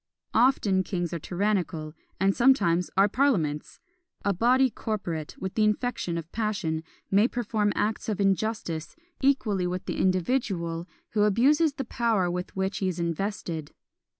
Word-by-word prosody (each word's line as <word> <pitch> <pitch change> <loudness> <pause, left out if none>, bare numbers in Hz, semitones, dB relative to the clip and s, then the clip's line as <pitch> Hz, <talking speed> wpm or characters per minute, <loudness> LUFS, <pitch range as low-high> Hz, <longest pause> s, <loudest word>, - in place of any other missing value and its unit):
Often 220 -6 +3
kings 175 -3 -3
are 170 - -2
tyrannical, 175 -4 -1 0.3
and 195 +1 +3
sometimes 180 -9 +3
are 195 +1 +6
parliaments! 195 - 0 0.5
A 200 - +3
body 250 +6 +3
corporate, 175 -9 -4
with 190 -1 -4
the 220 - +2
infection 210 -5 0
of 165 -1 -7
passion, 210 -8 -1 0.3
may 205 +4 +5
perform 215 -4 0
acts 215 +1 -1
of 210 - -2
injustice 195 -5 -1 0.3
equally 220 -9 +2
with 180 +1 -4
the - - -3
individual 185 -4 0 0.2
who 210 - +1
abuses 275 +10 +4
the 270 -2 -4
power 225 -7 +1
with 180 +1 -5
which 190 +1 -1
he 190 - 0
is 180 -2 -2
invested. 170 -2 -3
195 Hz, 145 wpm, -27 LUFS, 175-225 Hz, 0.5 s, are